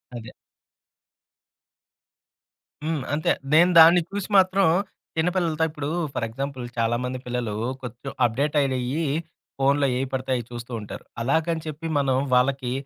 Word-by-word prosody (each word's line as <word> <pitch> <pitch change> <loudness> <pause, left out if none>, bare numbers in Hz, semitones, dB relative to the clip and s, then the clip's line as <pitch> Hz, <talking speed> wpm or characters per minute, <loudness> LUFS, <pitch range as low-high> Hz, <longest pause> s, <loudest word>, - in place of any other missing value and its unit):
అదే. 115 -1 -8 2.5
హ్మ్. 155 -3 -2
అంతే. 155 +1 +1 0.2
నేను 175 +3 +6
దాన్ని 170 +2 +8
చూసి 200 0 -4
మాత్రం 190 +1 +4 0.5
చిన్న 160 +2 +2
పిల్లలతో 165 -3 0
ఇప్పుడు 145 -2 -5 0.3
ఫర్ 115 - -1
ఎగ్జాంపుల్ 130 +1 -5
చాలామంది 120 +3 -1
పిల్లలు 120 -3 -2 0.3
కొంచెం 125 +3 -7
అప్డేట్ 140 +6 0
అయినయి 135 +3 -1 0.5
ఫోనులో 140 +1 +3
ఏయి 135 +1 -1
పడితే 130 0 -3
అయి 120 - -2
చూస్తూ 120 0 -8
ఉంటారు. 105 - -8 0.2
అలాగని 160 +6 0
చెప్పి 155 +2 -5
మనం 135 -2 +1 0.2
వాళ్ళకి 125 0 +2
135 Hz, 125 wpm, -24 LUFS, 125-160 Hz, 2.5 s, దాన్ని